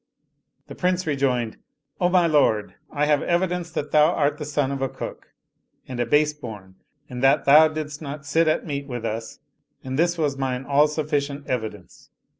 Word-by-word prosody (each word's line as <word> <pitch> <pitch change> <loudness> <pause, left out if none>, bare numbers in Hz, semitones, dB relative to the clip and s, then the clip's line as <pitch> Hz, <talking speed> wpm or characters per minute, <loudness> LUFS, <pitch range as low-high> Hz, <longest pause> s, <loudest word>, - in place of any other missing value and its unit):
The - - -10
Prince 185 0 0
rejoined, 130 -6 0 0.2
" 145 - -31
O 175 - +3
my 180 -1 +4
lord, 145 -10 +2 0.2
I 150 0 0
have 150 -1 +2
evidence 175 0 0
that 150 -3 -4
thou 150 0 +6
art 145 -3 0
the 150 - -4
son 145 -2 -1
of 135 -1 -4
a 135 - 0
cook - - -8 0.6
and 125 -2 -6
a 120 - 0
base 150 +3 +3
bom, 105 -10 -10 0.3
in 125 -2 -7
that 135 +2 +3
thou 150 +3 +8
didst 155 -1 -6
not 140 -1 -7
sit 160 +2 +2
at 155 - +1
meat 140 -3 -4
with 120 -3 -5
us 115 0 -5 0.4
and 130 +2 -4
this 170 +1 +2
was 145 -4 -1
mine 130 -1 -2
all 145 +2 +4
sufficient 145 -2 -2
evidence. 110 -7 -6
145 Hz, 190 wpm, -23 LUFS, 130-155 Hz, 0.6 s, thou